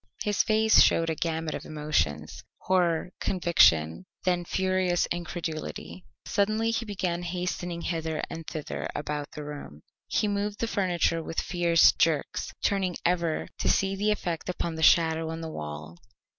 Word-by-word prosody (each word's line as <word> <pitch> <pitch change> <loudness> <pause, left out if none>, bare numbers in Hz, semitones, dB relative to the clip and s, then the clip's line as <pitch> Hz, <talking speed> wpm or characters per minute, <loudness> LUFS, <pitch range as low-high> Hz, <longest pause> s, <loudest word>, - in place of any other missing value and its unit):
His 205 -2 +2
face 220 0 +5
showed 165 -1 +4
a - - -2
gamut 160 0 -2
of - - -5
emotions 80 - -2
horror, 180 -2 +1
conviction, 165 - +3 0.2
then 180 -1 +1
furious 185 -1 +1
incredulity. 155 - -5 0.2
Suddenly 215 +1 +1
he 230 0 -2
began 185 -4 -2
hastening 175 -1 -3
hither 160 -2 -2
and 165 -1 -8
thither 155 -2 -4
about 145 0 -3
the 150 - -6
room. 145 - -9 0.2
He 210 - +1
moved 205 0 -2
the - - 0
furniture 180 -6 0
with 165 - -3
fierce 170 -2 +4
jerks, 155 -3 0
turning 190 -3 +1
ever 170 -2 0
to - - +1
see 195 0 +2
the 205 +2 0
effect 175 -5 -2
upon 170 -2 -2
the 160 - -5
shadow 160 0 +4
on 165 0 -5
the 160 -1 -5
wall. 75 - -7
170 Hz, 150 wpm, -27 LUFS, 155-185 Hz, 0.2 s, face